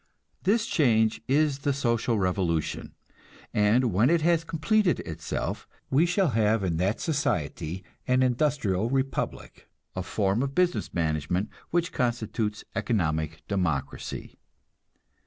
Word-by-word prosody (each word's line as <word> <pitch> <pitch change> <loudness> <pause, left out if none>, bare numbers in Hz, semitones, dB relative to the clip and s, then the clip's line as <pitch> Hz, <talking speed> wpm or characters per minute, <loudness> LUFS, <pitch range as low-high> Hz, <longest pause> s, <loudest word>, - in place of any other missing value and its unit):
This 210 +3 +2
change 110 - +2
is 145 0 +2
the 140 0 0
"social 120 -3 +1
revolution," 90 -4 -1 0.6
and 110 +2 +3
when 110 +8 +4
it 170 -1 +3
has 165 0 +3
completed 175 +4 +1
itself, 80 -7 -4 0.2
we 150 +6 +4
shall 180 0 +2
have 110 -2 +2
in 85 -3 0
that 95 +5 0
society 90 - -2 0.2
an 125 0 +3
Industrial 120 -6 +1
Republic, 135 +1 -3 0.3
a 95 - -2
form 100 +3 0
of 140 0 -2
business 180 -1 +1
management 80 +3 -1 0.2
which 170 0 0
constitutes 110 -3 -1
economic 80 - -1
democracy. 90 -9 -3
115 Hz, 120 wpm, -27 LUFS, 90-145 Hz, 0.6 s, when